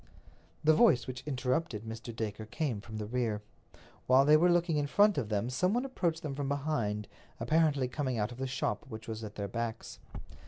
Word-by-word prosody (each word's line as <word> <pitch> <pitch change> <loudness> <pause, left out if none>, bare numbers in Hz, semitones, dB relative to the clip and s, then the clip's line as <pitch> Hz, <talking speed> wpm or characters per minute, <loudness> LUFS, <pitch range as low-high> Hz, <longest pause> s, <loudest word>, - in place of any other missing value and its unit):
The 155 +1 +6
voice 175 - +5
which 125 -1 -6
interrupted 130 -3 -1
Mr. 115 +1 -7
Dacre 110 -1 -4
came 120 -2 -2
from 110 0 -8
the 105 - -3
rear. 110 -2 -1 0.6
While 130 +2 +6
they 150 +1 +7
were 170 +3 +5
looking 175 -2 +2
in 145 -1 0
front 205 +6 +4
of 110 -6 -4
them 105 +3 -1
some 180 - +1
one 245 +2 0
approached 170 -11 -1
them 150 -3 -3
from 140 0 -3
behind, 135 -8 -1 0.3
apparently 155 -5 +2
coming 130 -1 -2
out 105 +2 -1
of 120 - -10
the 135 - -1
shop 135 +2 -2
which 110 -2 -8
was 110 0 -5
at 105 -1 -7
their 100 -1 -3
backs. 115 +2 -5
130 Hz, 200 wpm, -31 LUFS, 110-155 Hz, 0.6 s, they